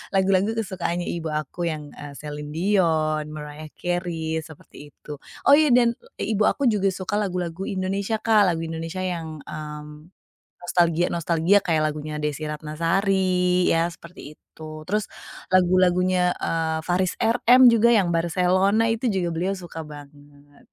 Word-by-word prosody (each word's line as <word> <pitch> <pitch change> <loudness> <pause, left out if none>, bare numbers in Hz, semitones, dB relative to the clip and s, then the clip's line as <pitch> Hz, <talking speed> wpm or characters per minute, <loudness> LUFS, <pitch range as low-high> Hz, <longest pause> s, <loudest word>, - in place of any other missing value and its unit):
lagu-lagu 195 +3 +2
kesukaannya 180 -5 -3
ibu 165 - -5
aku 155 +3 -3
yang, 150 -2 -5
eee, 145 -1 -10
Celine 150 0 -7
Dion, 160 -5 +1
Mariah 150 +1 -8
Carey, 170 -3 -2
seperti 155 -2 -13
itu. 150 -2 -10 0.2
Oh, - - +4
iya, 300 +1 +6
dan 240 -1 +4 0.2
e - - -5
ibu 215 0 +2
aku 280 - 0
juga 200 -2 +1
suka 190 +2 -2
lagu-lagu 180 -2 -3
Indonesia, 195 +3 -2
Kak. 215 -2 +3
Lagu 165 -2 0
Indonesia 165 +3 -5
yang, 160 -5 -5
mmm, 150 0 -9 0.5
nostalgia 175 -1 +1
nostalgia 170 +4 +2
kayak 160 -3 +1
lagunya 150 0 -6
Desy 150 0 -3
Ratnasari, 180 +4 0
ya, 165 +1 +2
seperti 170 -3 -12
itu. 155 0 -11
Terus 210 +2 -1 0.4
lagu-lagunya, 180 0 +3
eee, 160 -1 -1
Faris 180 +1 0
RM 245 +2 +5
juga 230 0 +4
yang 185 -5 +2
Barcelona 185 +5 +2
itu 230 +2 -1
juga 185 -5 0
beliau 185 +4 -1
suka 175 -3 -8
banget. 145 -1 -15
175 Hz, 140 wpm, -23 LUFS, 155-190 Hz, 0.5 s, iya